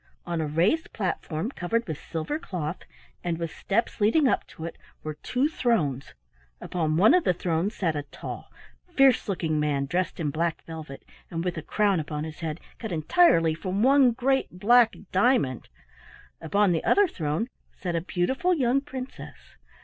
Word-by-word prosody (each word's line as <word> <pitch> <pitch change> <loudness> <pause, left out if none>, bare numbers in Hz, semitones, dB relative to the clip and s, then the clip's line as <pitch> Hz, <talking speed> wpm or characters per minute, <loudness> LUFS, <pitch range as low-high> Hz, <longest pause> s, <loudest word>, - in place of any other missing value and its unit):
On 170 -2 -2
a 155 - -1
raised 180 - +1
platform 185 0 -2
covered 230 +2 -1
with 155 -3 -5
silver 165 - -3
cloth, 175 - -5 0.4
and 170 -2 -1
with 165 -1 -4
steps 220 +2 -2
leading 260 +8 +4
up - - +1
to 160 - -9
it, 170 - -6 0.3
were 155 - -4
two 250 - 0
thrones; 175 - -1 0.4
upon 160 -3 -1
one 205 - +6
of 360 -1 +4
the 180 - +2
thrones 175 +4 -1
sat 165 -5 0
a 145 - -1
tall, 145 - -9 0.4
fierce 270 -5 +4
looking 160 -5 0
man 145 -2 0
dressed 180 +7 -2
in 150 -3 -1
black 165 +2 -1
velvet, 160 -4 -9 0.2
and 165 0 -3
with 180 - -1
a 160 - -4
crown 200 +2 +1
upon 150 -1 -4
his 160 0 -7
head 160 -1 -4 0.2
cut 220 - -5
entirely 165 - +4
from 190 +5 -2
one 270 -1 +6
great 265 +3 +1
black 230 +5 +4 0.2
diamond; 190 - +2 0.7
upon 200 +4 +2
the 165 - 0
other 410 -1 +4
throne 155 - -2 0.3
sat 175 -2 -3
a 165 - 0
beautiful 260 - 0
young 265 -2 +2
princess. 265 -2 -9
180 Hz, 170 wpm, -26 LUFS, 160-240 Hz, 0.7 s, one